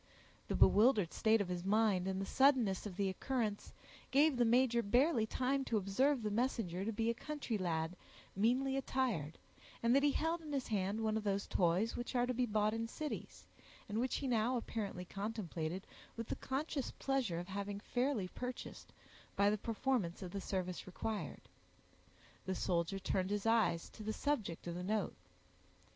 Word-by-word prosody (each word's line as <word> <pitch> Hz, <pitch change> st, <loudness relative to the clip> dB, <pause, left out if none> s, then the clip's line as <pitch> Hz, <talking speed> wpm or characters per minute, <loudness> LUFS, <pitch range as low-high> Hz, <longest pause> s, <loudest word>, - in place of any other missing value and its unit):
The -, -, -1 dB
bewildered 210 Hz, -5 st, +5 dB
state 220 Hz, -1 st, +3 dB
of 200 Hz, -, -1 dB
his 180 Hz, -1 st, -3 dB
mind, 200 Hz, -2 st, +2 dB
and 190 Hz, 0 st, -1 dB
the 195 Hz, -, -2 dB
suddenness 245 Hz, -7 st, +3 dB
of 190 Hz, -, -8 dB
the 200 Hz, 0 st, 0 dB
occurrence, 215 Hz, +1 st, -2 dB, 0.4 s
gave 290 Hz, +2 st, +4 dB
the 245 Hz, -1 st, +3 dB
major 235 Hz, 0 st, +4 dB
barely 240 Hz, +2 st, +3 dB
time 265 Hz, +4 st, 0 dB
to 230 Hz, -, +1 dB
observe 235 Hz, +7 st, +2 dB
the 210 Hz, -, -1 dB
messenger 210 Hz, -6 st, 0 dB
to 220 Hz, -, -1 dB
be 225 Hz, +2 st, +1 dB
a -, -, -2 dB
country 290 Hz, -2 st, -4 dB
lad, 170 Hz, -3 st, -1 dB, 0.4 s
meanly 250 Hz, +6 st, +2 dB
attired, 250 Hz, -, -1 dB, 0.5 s
and 235 Hz, +2 st, +4 dB
that 275 Hz, -, +5 dB
he 285 Hz, -1 st, +3 dB
held 330 Hz, +2 st, 0 dB
in 310 Hz, -2 st, -8 dB
his 275 Hz, -2 st, -2 dB
hand 205 Hz, +1 st, 0 dB
one 220 Hz, 0 st, +1 dB
of 220 Hz, -, -3 dB
those 200 Hz, -1 st, 0 dB
toys 180 Hz, +5 st, +1 dB
which 240 Hz, +2 st, -4 dB
are 245 Hz, 0 st, +3 dB
to 250 Hz, -, -1 dB
be 250 Hz, 0 st, +1 dB
bought 215 Hz, 0 st, +2 dB
in 225 Hz, 0 st, -2 dB
cities, 300 Hz, +5 st, -6 dB, 0.4 s
and 215 Hz, +2 st, -2 dB
which 255 Hz, +2 st, 0 dB
he 275 Hz, -, -2 dB
now 240 Hz, +1 st, +2 dB
apparently 205 Hz, -6 st, -4 dB
contemplated 190 Hz, -4 st, -4 dB, 0.3 s
with 230 Hz, -1 st, -5 dB
the -, -, -1 dB
conscious 275 Hz, 0 st, -2 dB
pleasure 265 Hz, -11 st, -1 dB
of 175 Hz, +2 st, -5 dB
having 200 Hz, +1 st, -3 dB
fairly 245 Hz, -2 st, 0 dB
purchased, 250 Hz, +4 st, -6 dB, 0.4 s
by 200 Hz, +1 st, +4 dB
the 210 Hz, -, +1 dB
performance 225 Hz, -5 st, -1 dB
of 180 Hz, -, -6 dB
the 200 Hz, -, -4 dB
service 185 Hz, -2 st, -3 dB
required. 210 Hz, +3 st, -4 dB, 1.1 s
The 190 Hz, -, 0 dB
soldier 175 Hz, +1 st, 0 dB
turned 190 Hz, 0 st, -1 dB
his 205 Hz, 0 st, -1 dB
eyes 225 Hz, -7 st, +3 dB
to -, -, -12 dB
the 215 Hz, +1 st, -2 dB
subject 220 Hz, -, -2 dB
of 175 Hz, -, -3 dB
the 175 Hz, -, -4 dB
note. 210 Hz, +1 st, 0 dB
220 Hz, 180 wpm, -36 LUFS, 190-250 Hz, 1.1 s, bewildered